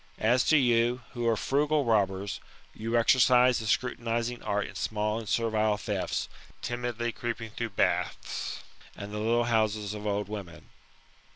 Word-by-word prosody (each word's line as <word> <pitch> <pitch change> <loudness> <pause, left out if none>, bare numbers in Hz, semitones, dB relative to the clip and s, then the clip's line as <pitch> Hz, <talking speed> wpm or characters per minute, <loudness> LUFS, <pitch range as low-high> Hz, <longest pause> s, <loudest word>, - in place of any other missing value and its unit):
As 120 +3 +3
to 155 - +5
you, 120 -1 +2
who 120 -2 -2
are 115 -1 +3
frugal 145 +3 +1
robbers, 100 -3 +1 0.3
you 115 +2 -1
exercise 125 +1 +5
the 110 - -5
scrutinizing 120 +1 -1
art 105 -1 -1
in - - -9
small 105 0 -1
and 110 - -7
servile 110 -2 +1
thefts, - - -2 0.4
timidly 120 -1 -2
creeping 115 -1 -5
through 115 +1 -3
baths, 95 - -1 0.3
and 100 +1 -8
the 105 - -3
little 115 +2 +2
houses 110 -3 0
of 105 0 -5
old 100 -1 -1
women." 100 -5 -8
115 Hz, 150 wpm, -29 LUFS, 105-120 Hz, 0.4 s, to